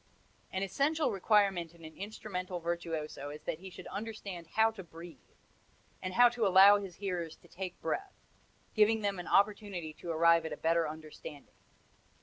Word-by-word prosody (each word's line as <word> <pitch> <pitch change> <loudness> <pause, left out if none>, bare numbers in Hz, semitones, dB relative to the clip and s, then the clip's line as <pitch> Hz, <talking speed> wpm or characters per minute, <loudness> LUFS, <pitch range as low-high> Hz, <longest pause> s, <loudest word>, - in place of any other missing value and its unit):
An 190 +1 -2
essential 280 - +1
requirement 195 -4 +2
in 165 -1 -13
an 160 - -11
instrumental 190 -3 -5
virtuoso 165 -4 -4
is 150 +1 -9
that 155 - -3
he 190 +1 -9
should - - -11
understand 200 -5 -6
how 220 0 +5
to 210 -4 -9
breathe, 165 - -13 0.7
and 185 0 -4
how 245 +1 +8
to 235 -3 0
allow 195 +2 +8
his 195 -3 -8
hearers 175 -5 -3
to - - -21
take 180 +1 -6
breath 385 - -3 0.6
giving 220 0 +4
them 200 -2 -1
opportunity 195 -3 +1
to 170 - -9
arrive 170 +1 +4
at 160 - -4
a - - -6
better 165 -1 +1
understanding. 155 -2 -10
185 Hz, 160 wpm, -32 LUFS, 165-205 Hz, 0.7 s, how